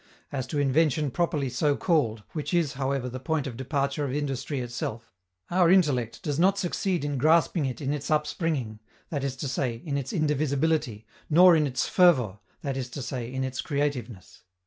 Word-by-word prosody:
As 130 -2 -3
to 145 - -3
invention 145 +1 +2
properly 150 -3 0
so 140 +4 +1
called, 115 - +1
which 155 +3 -2
is, 165 -5 +1
however, 135 -1 -1
the 130 +1 -5
point 150 +2 -1
of 130 -4 -5
departure 140 +3 -1
of 140 - -2
industry 140 0 -2
itself, 120 -2 -5 0.4
our 175 -1 +4
intellect 145 - +2
does 145 -1 -2
not 190 +3 +4
succeed 180 -3 -1
in 145 -2 -2
grasping 160 +1 +3
it 125 -3 -5
in 140 0 -1
its 145 -1 -4
upspringing, 150 - -1 0.3
that 145 -4 -2
is 135 -1 -2
to 135 +2 -4
say, 130 -2 -1
in 140 -3 -1
its 135 -1 -5
indivisibility, 150 -5 0 0.2
nor 175 +3 +7
in 155 -2 +2
its 130 -2 -1
fervor, 130 - +4 0.2
that 135 -2 -2
is 130 -2 -4
to 140 - -6
say, 120 -1 -4
in 130 0 -2
its 130 0 -3
creativeness. 140 - -3
140 Hz, 185 wpm, -27 LUFS, 130-155 Hz, 0.4 s, nor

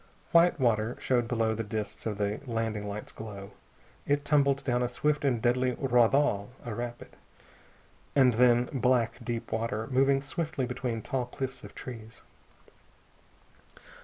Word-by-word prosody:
White 170 -1 +5
water 115 -2 +1
showed 120 -2 +1
below 115 -2 +1
in 110 - -3
the 115 - -1
disks 105 0 -4
of 105 -2 -3
the 105 0 -1
landing 110 -3 -2
lights' 100 +1 -6
glow. 100 -3 -8 0.6
It 145 0 +1
tumbled 140 -2 +3
down 125 -2 +1
a 125 - 0
swift 150 +4 0
and 130 -4 +2
deadly 125 +2 +2
raudal 125 -4 +2 0.2
a 120 - -4
rapid. 120 +2 -6 1.0
And 130 -3 +5
then 120 +1 +4
black, 125 -1 +1
deep 115 0 -4
water, 110 -1 -1
moving 135 +1 +3
swiftly 150 -2 -2
between 120 -3 -3
tall 125 -2 -2
cliffs 130 +1 -5
of - - -11
trees. 115 -3 -9
120 Hz, 145 wpm, -29 LUFS, 110-135 Hz, 1.0 s, White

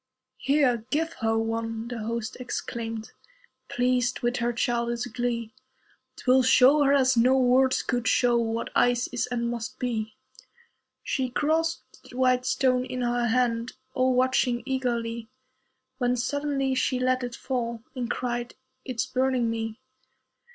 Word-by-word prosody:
"Here, 270 -5 +2
give 325 +5 0
her 225 0 +1
one," 225 0 -2
the 240 -1 -5
host 225 0 -3
exclaimed, 230 -3 -5 0.6
Pleased 250 0 +1
with 240 +1 0
her 240 0 0
childish 235 0 -1
glee. 240 -2 -3 0.6
"'Twill 260 +1 +3
show 265 +4 +5
her 280 -1 +4
as 265 -2 +4
no 250 +3 +4
words 260 +1 +3
could 245 -2 -1
show 245 -1 +3
What 230 -1 -1
ice 245 0 +3
is, 245 0 -2
and 240 -1 -2
must 240 +2 -5
be." 220 -4 -3 0.9
She 260 -2 -1
grasped 320 +5 -2
the 250 - -10
"white 255 -1 +2
stone" 255 -1 +2
in 255 0 -4
her 240 0 +1
hand, 235 0 0 0.2
All 255 -1 +2
watching 250 -1 +2
eagerly, 235 -4 -2 0.7
When 245 -1 +2
suddenly 275 +1 -1
she 260 0 +1
let 255 0 +1
it 245 -1 -4
fall, 235 -3 -3
And 250 -2 -4
cried, 240 -1 -3 0.3
"It's 250 -5 -2
burning 255 -3 0
me." 225 -1 -4
245 Hz, 140 wpm, -26 LUFS, 235-255 Hz, 0.9 s, show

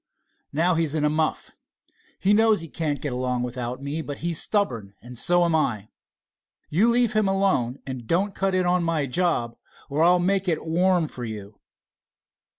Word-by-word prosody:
"Now 170 +5 +2
he's 160 -2 0
in 150 -1 +1
a 150 - +2
muff. 155 0 -1 0.7
He 200 - +2
knows 220 -3 +4
he 165 - -6
can't 150 -3 -2
get 145 -4 -3
along 125 0 -1
without 125 +1 -5
me, 145 +3 -3
but 145 -2 -6
he's 170 -2 0
stubborn, 115 - -1
and 125 +1 -11
so 175 +8 +2
am 170 - +1
I. 110 -10 0 0.8
You 200 +10 +3
leave 240 -1 +2
him 215 -2 +2
alone, 190 -11 +1
and 130 -4 -6
don't 195 +4 +1
cut 195 0 0
in 185 -1 +2
on 175 0 +2
my 165 -3 0
job, 130 -5 0 0.4
or 145 +3 0
I'll 175 +2 +6
make 190 +2 0
it 165 -2 -1
warm 175 0 +2
for 125 - -8
you." 105 -2 -7
160 Hz, 180 wpm, -24 LUFS, 125-180 Hz, 0.8 s, I'll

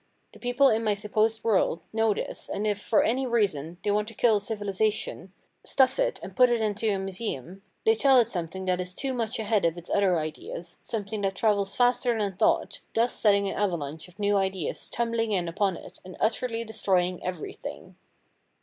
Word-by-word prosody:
The - - -15
people 245 +3 +3
in 225 +1 +1
my 210 -2 +2
supposed 215 +2 0
world 195 -6 +2
know 225 0 +3
this - - -4
and 205 - -2
if, 205 -1 0
for 215 - +3
any 255 +4 +1
reason, 175 - 0
they 205 - +1
want 210 +1 +1
to 225 - -8
kill 225 -2 +4
a - - -4
civilisation, 205 -2 -2 0.3
stuff 265 - +2
it - - +1
and - - -8
put 250 -1 +6
it 240 -1 +2
into 215 0 0
a 200 - +1
museum, 190 - -5 0.2
they 445 - +6
tell 275 - +5
it 235 - +3
something 190 -2 -4
that 185 -1 +1
is 180 0 -7
too 270 -1 -2
much 235 0 -2
ahead 215 -3 +1
of 170 0 +1
its 175 - -9
other 195 -3 +3
ideas, 160 +2 -6
something 210 -1 -4
that 195 -1 -1
travels 200 -3 +1
faster 245 -1 +2
than 200 -3 -1
thought, - - +1 0.2
thus 235 +2 +3
setting 200 -2 +3
an - - -2
avalanche 160 -6 -2
of 180 +1 -19
new 205 -1 +2
ideas 190 -4 -2
tumbling 230 -2 -1
in 180 -3 0
upon 190 +1 0
it - - -12
and 185 0 -11
utterly 230 +1 0
destroying 185 -5 0
everything. 180 -3 -6
205 Hz, 195 wpm, -27 LUFS, 185-225 Hz, 0.3 s, put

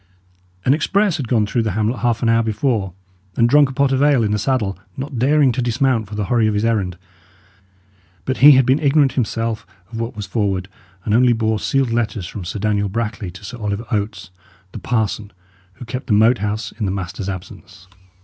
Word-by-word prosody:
An 130 - +5
express 195 +4 +1
had 135 - -4
gone 110 -2 +2
through 115 +3 0
the 110 -4 -2
hamlet 110 +3 -1
half 120 0 0
an 115 - +2
hour 115 0 +4
before, 110 -3 -1 0.4
and 115 - +3
drunk 145 +2 +5
a - - -5
pot 140 +1 +2
of 135 0 +1
ale 145 -5 +4
in 105 - 0
the 105 - 0
saddle, 105 -5 0 0.2
not 135 -2 -5
daring 140 +1 +4
to 125 - -2
dismount 120 -2 0
for 105 - -8
the 105 -1 -2
hurry 115 0 +2
of 105 - 0
his 105 +2 0
errand; 100 -6 0 1.3
but 130 - -1
he 145 +3 +9
had 130 -1 +4
been 130 +4 +3
ignorant 140 -2 +3
himself 115 -3 -2 0.3
of 115 - -6
what 115 +1 -4
was 105 -1 -5
forward, 100 -2 -2 0.4
and 105 - 0
only 120 +1 +5
bore 110 -1 0
sealed 135 -1 0
letters 115 -5 -1
from 95 +2 -7
Sir 90 +4 -5
Daniel 105 -1 0
Brackley 110 -1 -3
to 95 +4 -11
Sir 120 +4 -8
Oliver 105 +1 -3
Oates, 105 -3 -3 0.4
the - - -7
parson, 110 -3 -2 0.4
who 125 - -11
kept 125 +3 -6
the 110 - +1
Moat 110 +4 +4
House 105 +1 -3
in 110 - -4
the 95 - -1
master's 95 0 -4
absence. 95 0 -9
115 Hz, 210 wpm, -19 LUFS, 105-130 Hz, 1.3 s, he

